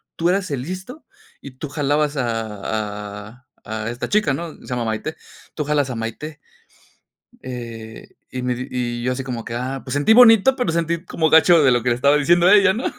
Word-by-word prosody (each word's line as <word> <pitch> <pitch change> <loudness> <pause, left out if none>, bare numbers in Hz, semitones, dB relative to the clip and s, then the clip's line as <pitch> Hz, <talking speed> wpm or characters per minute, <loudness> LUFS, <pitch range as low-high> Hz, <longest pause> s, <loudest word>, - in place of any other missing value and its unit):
tú 170 +1 0
eras 185 0 0
el 135 -3 -2
listo 185 - -8 0.4
y 140 - -10
tú 150 - -5
jalabas 145 0 0
a 115 -5 -3 0.7
a 125 +4 -18 0.2
a 110 0 -4
esta 120 +2 -5
chica.", 210 -9 +2
¿no?, 165 +2 -5
se - - -17
llama 125 -2 -2
Maite, 110 +8 -4 0.4
"Tú 150 - -3
jalas 145 -2 0
a 125 - -4
Maité". 115 +7 -6 1.0
Eh, 115 -3 -8 0.2
y 130 - -4
me 125 0 -1
di 125 +2 -6
y 120 -1 -3
yo 125 - 0
así 130 +1 -3
como 120 -3 -5
que, - - -6
"ah", 130 +2 -4
pues 130 - -6
sentí 145 +10 +3
bonito, 240 +1 +7
pero 250 -11 -1
sentí 170 0 -1
como 160 -2 0
gacho 160 +1 +6
de 130 - +5
lo 120 -1 +1
que 125 - +1
le 120 - +2
estaba 140 +4 +3
diciendo 170 +4 +3
a 185 - +7
ella, 200 -2 +5
¿no?, 240 - -4
140 Hz, 215 wpm, -21 LUFS, 120-170 Hz, 1.0 s, bonito